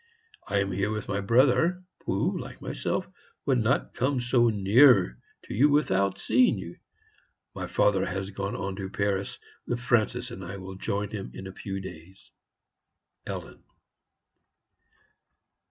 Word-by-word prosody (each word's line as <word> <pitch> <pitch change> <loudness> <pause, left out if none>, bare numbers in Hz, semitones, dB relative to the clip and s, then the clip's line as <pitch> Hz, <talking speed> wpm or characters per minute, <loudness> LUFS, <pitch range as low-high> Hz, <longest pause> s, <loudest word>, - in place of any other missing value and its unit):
I 100 - 0
am 100 0 -1
here 100 +2 0
with 105 -1 -3
my 100 - -1
brother, 130 - +3 0.2
who, - - +1
like - - -8
myself, - - -2 0.4
would 130 -3 +3
not 115 +2 +1
come 130 +2 0
so 120 -1 +3
near 105 - +5 0.2
to - - -7
you 135 +8 +5
without 100 -10 +2
seeing 120 -1 +3
you. 85 -2 -8 0.8
My - - -5
father 95 -2 +2
has 95 +2 -3
gone 100 0 -3
on 100 0 -3
to 95 -1 -4
Paris, 100 -1 -1 0.3
where 120 - -1
Francis 120 0 +1
and 95 -5 -7
I 95 +2 -6
will 95 0 -8
join 100 +2 -3
him 100 - -5
in 95 - -7
a 95 - -7
few 95 0 -5
days. 95 0 -11 1.0
ELLEN." - - -6
100 Hz, 145 wpm, -27 LUFS, 95-120 Hz, 1.0 s, near